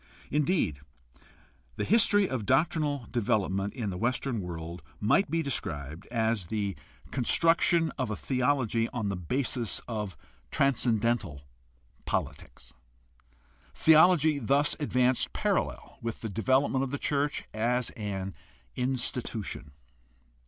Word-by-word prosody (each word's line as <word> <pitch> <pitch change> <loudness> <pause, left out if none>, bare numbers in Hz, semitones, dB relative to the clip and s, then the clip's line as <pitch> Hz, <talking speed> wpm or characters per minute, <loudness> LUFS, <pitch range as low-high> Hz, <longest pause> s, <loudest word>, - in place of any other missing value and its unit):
Indeed, 150 - +1 1.0
the - - -2
history 205 -2 +4
of 130 -4 -3
doctrinal 145 +1 +1
development 100 -3 0
in 110 -6 -3
the 90 - -5
Western 120 -1 -1
world 85 -1 -6 0.2
might 140 - +3
be 165 +1 0
described 80 - -4
as 110 -5 0
the 100 -1 -2 0.4
construction 165 +5 +3
of 130 -4 -1
a 110 - -2
theology 125 -2 0
on 110 -4 -2
the 100 - -2
basis 120 - -1
of 105 -5 -4 0.3
transcendental 115 - +1 0.6
politics. - - -4 1.0
Theology 160 -2 +5
thus 140 +4 +2
advanced 125 -3 +1
parallel - - -2
with 115 -1 -4
the 110 - -4
development 130 +6 +2
of 135 - -2
the 145 - -2
church 145 +1 0
as 120 +3 0
an 95 -4 -4 0.4
institution. 125 - -2
120 Hz, 110 wpm, -29 LUFS, 105-140 Hz, 1.0 s, Theology